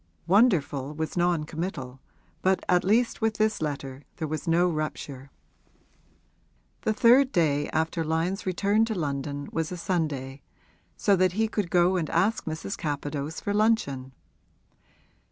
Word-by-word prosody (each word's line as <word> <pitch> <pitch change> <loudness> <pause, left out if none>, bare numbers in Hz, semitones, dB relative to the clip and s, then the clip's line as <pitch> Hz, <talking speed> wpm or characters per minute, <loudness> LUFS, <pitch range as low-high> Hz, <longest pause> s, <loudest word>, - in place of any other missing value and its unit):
'Wonderful' 155 - +2
was 160 0 -3
non 175 -2 +2
committal, 150 -6 -5 0.4
but 190 0 +2
at 180 +1 +3
least 230 +6 +2
with 220 -1 +1
this 215 -3 +1
letter 140 -3 -4
there 160 - -3
was 155 +1 -4
no 170 +2 +4
rupture. 150 -4 -4 1.5
The 220 - +1
third 245 +5 +5
day 145 -4 +1
after 160 +1 -1
Lyon's 165 +5 -1
return 200 +4 +2
to 225 -1 -3
London 145 -3 -3
was 165 0 -2
a 180 - -4
Sunday, 145 -7 -2 0.6
so 205 -4 +3
that 185 0 +2
he 220 +3 +1
could 210 -4 -2
go 180 +1 +3
and 160 -4 -2
ask 220 +3 +1
Mrs. 160 +5 -4
Capadose 145 0 -4
for 205 - -2
luncheon. 205 - +1
165 Hz, 140 wpm, -27 LUFS, 145-195 Hz, 1.5 s, third